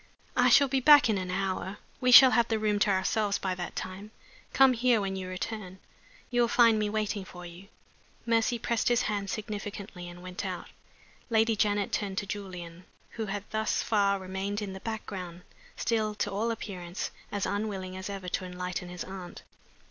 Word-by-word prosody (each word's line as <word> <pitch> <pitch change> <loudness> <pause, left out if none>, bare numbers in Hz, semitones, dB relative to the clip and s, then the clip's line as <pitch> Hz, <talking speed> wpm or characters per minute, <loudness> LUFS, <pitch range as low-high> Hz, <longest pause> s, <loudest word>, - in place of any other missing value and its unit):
"I 245 0 +5
shall 280 +3 +6
be 265 0 +1
back 290 -3 +7
in 200 - 0
an 185 -1 -4
hour." 190 +1 -2 0.2
"We 250 -1 +2
shall 260 +1 +11
have 235 0 +3
the 225 - 0
room 210 -1 +1
to 205 - +3
ourselves 200 +2 +1
by 190 -1 -2
that 180 -1 -6
time. 190 +3 -6 0.4
Come 270 -1 +6
here 240 -1 +3
when 195 -1 -2
you 185 -1 -5
return. 185 0 -5 0.5
You 245 0 +2
will 235 - +4
find 230 -2 +5
me 210 -1 0
waiting 210 -1 -2
for 180 -1 -11
you." 175 +3 -11 0.6
Mercy 230 +1 +2
pressed 235 0 -1
his 240 -1 +3
hand 200 -2 -2
significantly 205 -4 -6
and 175 0 -11
went 185 0 -6
out. - - -5 0.6
Lady 225 0 +3
Janet 205 -1 +1
turned 195 -2 -2
to 205 - -1
Julian, 180 -3 -7 0.3
who 220 -2 -4
had 200 0 -3
thus 220 0 0
far 200 -2 +2
remained 190 +2 -3
in 200 -3 -5
the 190 - -7
background, 190 -5 -6 0.3
still, 215 -2 0
to 205 -1 -2
all 215 +4 -1
appearance, 185 -5 -5 0.2
as 205 -2 -1
unwilling 200 -3 -3
as 190 +2 -6
ever 195 -2 -6
to 180 - -2
enlighten 180 0 -5
his 180 -1 -6
aunt. 190 -2 -9
205 Hz, 185 wpm, -29 LUFS, 185-220 Hz, 0.6 s, shall